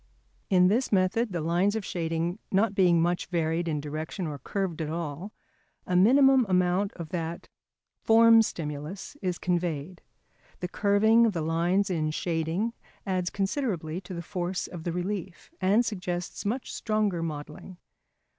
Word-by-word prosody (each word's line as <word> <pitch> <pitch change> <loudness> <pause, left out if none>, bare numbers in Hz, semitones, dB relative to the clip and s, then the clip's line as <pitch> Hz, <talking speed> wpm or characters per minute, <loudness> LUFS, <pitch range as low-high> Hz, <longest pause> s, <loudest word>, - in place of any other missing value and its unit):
] - - -40
In 180 0 +6
this 235 +7 +1
method 200 +4 +2
the 175 -3 -2
lines 175 +6 +1
of 220 -3 -3
shading 165 +2 -2
not 200 +2 +2
being 180 -4 +4
much 175 +1 0
varied 170 -1 -1
in 155 -2 -1
direction 155 +5 -5
or 150 -3 -5
curved 180 +2 -3
at 155 - -3
all, 165 +4 -4 0.5
a 180 - -1
minimum 265 +7 +6
amount 180 +2 +2
of 165 -3 -8
that 170 -2 -4 0.5
"form 225 0 +6
stimulus" 160 - -5
is 180 -3 -1
conveyed. 175 -1 -2 0.6
The 180 - -3
curving 220 +4 +4
of 215 - -1
the 165 -3 -2
lines 175 +5 +1
in 155 -3 0
shading 165 +7 -1 0.3
adds 185 -2 -1
considerably 195 - -2
to 180 0 -8
the 170 - -5
force 180 +1 -3
of 170 -3 -9
the 170 - -1
relief, 180 - -4
and 205 +6 +3
suggests 180 -3 -4
much 245 +5 -3
stronger 215 -5 0
modelling. 155 +3 -6
180 Hz, 155 wpm, -27 LUFS, 165-200 Hz, 0.6 s, In